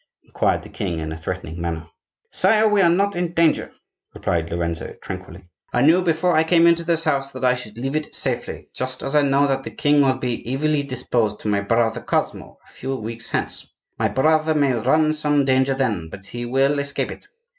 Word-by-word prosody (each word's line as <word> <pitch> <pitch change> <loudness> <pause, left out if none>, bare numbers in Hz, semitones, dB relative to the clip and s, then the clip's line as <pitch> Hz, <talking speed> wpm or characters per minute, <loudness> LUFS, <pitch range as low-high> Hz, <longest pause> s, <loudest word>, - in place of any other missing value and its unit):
inquired - - 0
the - - -11
king, 85 - -3
in 80 0 -4
a - - -4
threatening 80 0 -5
manner. 80 -2 -3 0.5
"Sire, 220 0 +3
we 210 -1 +3
are 170 - +5
not 200 +4 +1
in 175 0 0
any 170 - -6
danger," 165 -2 +2 0.4
replied 85 -1 -1
Lorenzo, 85 -1 -3
tranquilly. - - -9 0.2
"I 120 - +2
knew 165 +5 +5
before 175 0 +1
I 160 - +5
came 165 +1 +4
into 170 0 +4
this 165 -1 +1
house 140 -3 0
that 130 0 -3
I 125 - +5
should 115 -4 -8
leave 135 +4 -3
it 155 0 -3
safely, - - -3
just 130 0 -3
as 135 - -3
I 150 - +5
know 140 0 +3
that 135 -1 0
the - - -5
king 145 -1 +2
will 130 -2 +2
be 125 0 -3
evilly 150 +1 +1
disposed 125 -5 -1
to 105 - -2
my 100 -1 +1
brother 115 +2 +1
Cosmo - - -2
a - - -20
few 135 +1 -4
weeks 115 -1 -6
hence. - - -3 0.3
My - - +2
brother 155 +3 +2
may 140 -3 +3
run 155 +7 +2
some 150 -2 +1
danger 130 0 +2
then, 105 -12 -1
but 95 +3 -11
he 120 +4 -6
will 135 +3 +2
escape 140 0 -2
it. - - -11
135 Hz, 210 wpm, -22 LUFS, 115-155 Hz, 0.5 s, are